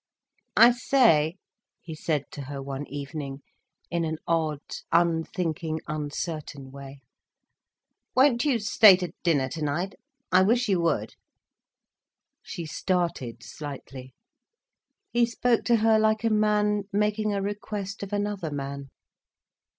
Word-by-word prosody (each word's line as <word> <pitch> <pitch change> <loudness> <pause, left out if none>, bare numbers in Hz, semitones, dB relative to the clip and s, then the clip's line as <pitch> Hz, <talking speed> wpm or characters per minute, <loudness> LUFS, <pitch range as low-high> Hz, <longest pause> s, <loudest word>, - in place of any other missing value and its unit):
"I 235 +2 +9
say," 230 - +3 0.4
he 165 - -9
said 155 -2 -1
to 140 - -7
her 140 +1 -6
one 135 +1 -5
evening, 140 -1 -6 0.5
in 170 -1 0
an 160 -1 -2
odd, 160 -3 0 0.3
unthinking, 165 -1 0
uncertain 150 -2 -5
way, 140 0 -11 1.1
"won't 255 -2 +4
you 280 -5 +2
stay 205 -1 +7
to 180 -2 -5
dinner 145 -7 +2
tonight? 160 +6 -2 0.4
I 185 - +6
wish 235 +5 +3
you 190 -4 +2
would." 150 -10 0 1.3
She 170 - -7
started 160 -8 -2
slightly. 130 -1 -9 1.0
He 240 0 +3
spoke 235 0 +1
to 240 - +4
her 220 0 +4
like 215 0 +2
a 225 - +2
man 210 -1 +2
making 210 +1 0
a - - 0
request 200 0 -4
of 200 0 -6
another 205 -4 -2
man. 140 -1 -5
170 Hz, 120 wpm, -26 LUFS, 145-210 Hz, 1.3 s, I